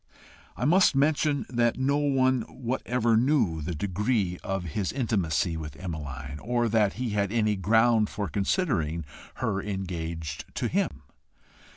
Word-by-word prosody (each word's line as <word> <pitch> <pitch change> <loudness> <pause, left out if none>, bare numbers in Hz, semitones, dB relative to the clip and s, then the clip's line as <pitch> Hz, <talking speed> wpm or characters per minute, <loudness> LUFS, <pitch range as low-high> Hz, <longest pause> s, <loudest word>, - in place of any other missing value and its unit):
I 125 - -1
must 175 0 +5
mention 145 0 +2
that 120 -1 +1
no 135 +2 +2
one 130 -3 +2
whatever 125 -2 0
knew 115 - +2
the 85 +3 -3
degree 100 +1 0
of 95 -1 -2
his 90 +3 -2
intimacy 90 - 0
with 75 -3 -6
Emmeline, 70 -5 -6
or 120 +3 0
that 105 -2 +3
he 125 -1 -3
had 100 -1 0
any 110 -2 +2
ground 110 +3 +3
for 100 -2 -3
considering 85 - 0 0.3
her 95 -1 -1
engaged 85 -6 -4
to - - 0
him. 70 -1 -1
105 Hz, 140 wpm, -27 LUFS, 85-125 Hz, 0.3 s, must